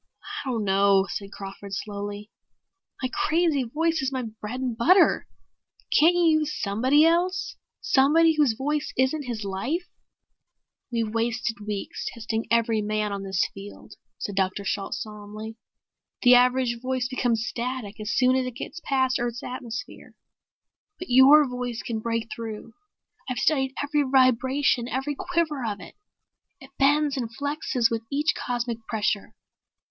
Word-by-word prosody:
"I 270 Hz, -, -6 dB
don't 230 Hz, -4 st, -1 dB
know," 195 Hz, 0 st, +4 dB
said 200 Hz, -1 st, -5 dB
Crawford 195 Hz, 0 st, -7 dB
slowly. 205 Hz, +1 st, -6 dB, 0.7 s
"My 255 Hz, -, 0 dB
crazy 320 Hz, -3 st, +2 dB
voice 320 Hz, +6 st, 0 dB
is 265 Hz, 0 st, -1 dB
my 260 Hz, -1 st, -2 dB
bread 220 Hz, +2 st, -6 dB
and 255 Hz, -3 st, -2 dB
butter. 350 Hz, -, +4 dB, 0.6 s
Can't 335 Hz, +3 st, +5 dB
you 330 Hz, -3 st, +4 dB
use 305 Hz, -1 st, -3 dB
somebody 255 Hz, +9 st, +3 dB
else? 365 Hz, +4 st, +1 dB, 0.3 s
Somebody 320 Hz, -2 st, +4 dB
whose 295 Hz, -6 st, +3 dB
voice 295 Hz, +5 st, -2 dB
isn't 260 Hz, +2 st, +1 dB
his 225 Hz, -3 st, -4 dB
life?" 240 Hz, -, -2 dB, 1.0 s
"We've 225 Hz, -2 st, -1 dB
wasted 230 Hz, -1 st, -1 dB
weeks 205 Hz, -2 st, -4 dB
testing 225 Hz, -1 st, -4 dB
every 230 Hz, -1 st, +2 dB
man 210 Hz, 0 st, -1 dB
on 200 Hz, -, -4 dB
this 190 Hz, -1 st, 0 dB
field," 200 Hz, +1 st, -11 dB, 0.2 s
said 205 Hz, -, -5 dB
Dr. 190 Hz, +1 st, 0 dB
Shalt 195 Hz, 0 st, -2 dB
solemnly. 215 Hz, +1 st, -8 dB, 0.7 s
"The 250 Hz, 0 st, +8 dB
average 250 Hz, -1 st, +3 dB
voice 255 Hz, 0 st, -1 dB
becomes 245 Hz, -3 st, 0 dB
static 240 Hz, -4 st, -4 dB
as 210 Hz, -1 st, -4 dB
soon 255 Hz, +3 st, +3 dB
as 260 Hz, -1 st, 0 dB
it 250 Hz, -, -6 dB
gets 335 Hz, +6 st, -7 dB
past 260 Hz, -2 st, +1 dB
Earth's 240 Hz, 0 st, -3 dB
atmosphere. 250 Hz, -1 st, -7 dB, 0.8 s
But 360 Hz, -, -8 dB
your 275 Hz, +4 st, +7 dB
voice 250 Hz, -2 st, -4 dB
can 225 Hz, -2 st, -3 dB
break 230 Hz, 0 st, -2 dB
through. 225 Hz, -1 st, -7 dB, 0.6 s
I've 255 Hz, -, -2 dB
studied 270 Hz, -3 st, +1 dB
every 295 Hz, +1 st, +1 dB
vibration, 260 Hz, -1 st, +2 dB
every 270 Hz, +5 st, -2 dB
quiver 315 Hz, -3 st, -1 dB
of 210 Hz, -3 st, -3 dB
it. -, -, -11 dB, 0.7 s
It 270 Hz, -2 st, -14 dB
bends 290 Hz, +1 st, +3 dB
and 240 Hz, -3 st, -2 dB
flexes 285 Hz, -5 st, 0 dB
with 230 Hz, -1 st, -1 dB
each 295 Hz, +2 st, +1 dB
cosmic 240 Hz, -2 st, -3 dB
pressure. 215 Hz, -1 st, -1 dB
245 Hz, 145 wpm, -25 LUFS, 220-280 Hz, 1.0 s, The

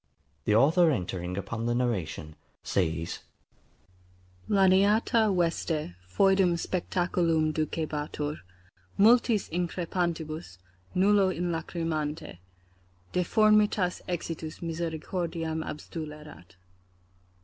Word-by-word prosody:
The 105 Hz, -, +3 dB
author 160 Hz, +8 st, +5 dB
entering 90 Hz, -, -2 dB
upon 110 Hz, +4 st, -3 dB
the 120 Hz, -, +1 dB
narration, 95 Hz, -10 st, -2 dB, 0.3 s
says, 85 Hz, -2 st, -1 dB, 1.3 s
LANIATA 205 Hz, +3 st, +4 dB
VESTE, 165 Hz, -, -1 dB
FOEDUM 190 Hz, -, +3 dB
SPECACULUM 170 Hz, -3 st, 0 dB
DUCEBATUR, 150 Hz, -1 st, -3 dB, 0.6 s
MULTIS 225 Hz, 0 st, +4 dB
INCREPANTIBUS, 170 Hz, -, -3 dB, 0.4 s
NULLO 195 Hz, +1 st, +4 dB
INLACRIMANTE: 165 Hz, -, -3 dB, 0.7 s
deformatitas 210 Hz, 0 st, +3 dB
exitus 165 Hz, -2 st, -4 dB
misericordiam 165 Hz, 0 st, -3 dB
abstulerat. 150 Hz, -, -8 dB
165 Hz, 70 wpm, -28 LUFS, 150-180 Hz, 1.3 s, author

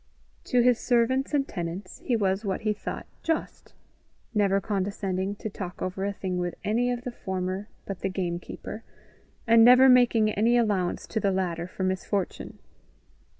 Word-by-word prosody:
To 250 Hz, -, +3 dB
his 245 Hz, -1 st, +4 dB
servants 255 Hz, +3 st, +1 dB
and 285 Hz, -2 st, +1 dB
tenants 180 Hz, +1 st, -6 dB
he 245 Hz, -, 0 dB
was 195 Hz, -1 st, 0 dB
what 195 Hz, -3 st, -2 dB
he 215 Hz, -1 st, +1 dB
thought 210 Hz, -, -6 dB, 0.2 s
just 325 Hz, -1 st, -3 dB, 0.6 s
never 200 Hz, -2 st, +3 dB
condescending 195 Hz, -1 st, -2 dB
to 210 Hz, -, -6 dB
talk 190 Hz, -3 st, -7 dB
over 185 Hz, +1 st, -3 dB
a 200 Hz, -, 0 dB
thing 185 Hz, -2 st, -3 dB
with 175 Hz, -1 st, -2 dB
any 235 Hz, +4 st, +1 dB
of 245 Hz, -1 st, -2 dB
the 250 Hz, -, -4 dB
former 190 Hz, -2 st, -4 dB, 0.2 s
but 195 Hz, -3 st, -5 dB
the 195 Hz, -, -1 dB
game 175 Hz, -2 st, -2 dB
keeper, 215 Hz, +5 st, -8 dB, 0.6 s
and 230 Hz, 0 st, +6 dB
never 250 Hz, +2 st, +8 dB
making 240 Hz, -4 st, +5 dB
any 230 Hz, +4 st, +3 dB
allowance 205 Hz, -6 st, 0 dB
to 220 Hz, -, -2 dB
the 200 Hz, -, +1 dB
latter 175 Hz, -3 st, -2 dB
for 185 Hz, -, -5 dB
misfortune. 190 Hz, +1 st, -2 dB
200 Hz, 165 wpm, -27 LUFS, 185-235 Hz, 0.6 s, never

